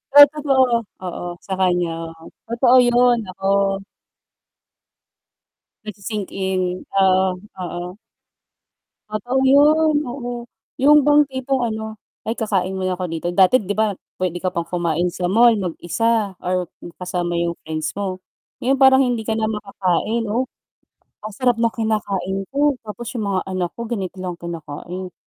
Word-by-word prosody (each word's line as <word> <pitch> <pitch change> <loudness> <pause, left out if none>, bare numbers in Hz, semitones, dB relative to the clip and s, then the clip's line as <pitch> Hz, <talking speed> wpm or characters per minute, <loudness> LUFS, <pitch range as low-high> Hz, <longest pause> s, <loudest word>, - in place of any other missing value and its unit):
Di, 290 - +12
totoo, 280 -3 +2 0.4
oo, 175 -1 -5 0.2
sa 195 - -4
kanya, 180 -2 +2 0.6
totoo 240 +2 +3
yun 245 0 +4
nako. 195 +1 -5 2.4
Nagsi-sink 210 -1 -5
in, 185 -1 -2
oo, 190 -1 +3 0.2
oo. 175 +2 -6 1.1
Totoo 240 +5 -2
yun, 300 +3 +5
oo. 245 -3 -6 0.3
Yung 295 0 +6
bang 295 0 +6
tipong 260 0 -1
ano, 220 0 -5 0.3
ay, 225 - -1
kakain 195 -5 -1
mo 190 - -4
na 180 - -2
ako 185 - -3
dito. 165 0 -4
Dati 190 +7 +4
'di 205 +2 -4
ba 220 -2 +2 0.2
pwede 175 -1 -2
ka 185 - 0
pang 170 -2 -3
kumain 175 0 -1
sa 180 -1 -2
mall 230 +4 +6
mag-isa 205 +3 -1
or 180 0 -1 0.3
kasama 175 -1 -2
yung 170 0 0
friends 155 0 -4
mo. 195 -2 -3 0.4
Ngayon, 265 +2 +1
parang 265 0 +7
hindi 245 -2 -1
ka 220 0 -2
na 220 - 0
makakain, 210 +1 -1
'no, 245 +5 -1 0.7
ang 215 - -7
sarap 245 -3 +1
ng 230 -1 +1
kinakain 200 -4 -1
ko 290 +1 +2 0.2
tapos 230 +3 -6
yung 220 - -2
mga 190 -1 +1
anak 185 -2 -2
ko - - -9
ganito 195 -6 -4
lang 185 -1 -4
kinakain, 170 +2 -7
200 Hz, 145 wpm, -21 LUFS, 180-240 Hz, 2.4 s, Di